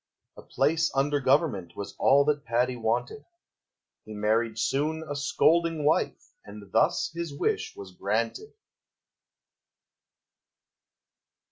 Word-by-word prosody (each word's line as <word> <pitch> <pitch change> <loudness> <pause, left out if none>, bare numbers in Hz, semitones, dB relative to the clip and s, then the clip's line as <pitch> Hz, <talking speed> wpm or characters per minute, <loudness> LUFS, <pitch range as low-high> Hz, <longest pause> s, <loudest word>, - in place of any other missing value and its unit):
A - - -11
place 160 +4 +1
under 145 +2 +1
Government 125 - +1
Was 100 0 -7
all 140 +1 +5
that 145 -2 0
Paddy 120 +2 0
wanted. 120 - -2 0.8
He 110 - -10
married 110 +2 0
soon 150 +8 -1
a 145 - -4
scolding 160 +2 +1
wife, 155 - 0
And 100 -1 -12
thus 110 - +2
his 170 -2 -4
wish - - -1
was 95 -2 -10
granted. 115 - -2
130 Hz, 110 wpm, -27 LUFS, 110-150 Hz, 0.8 s, all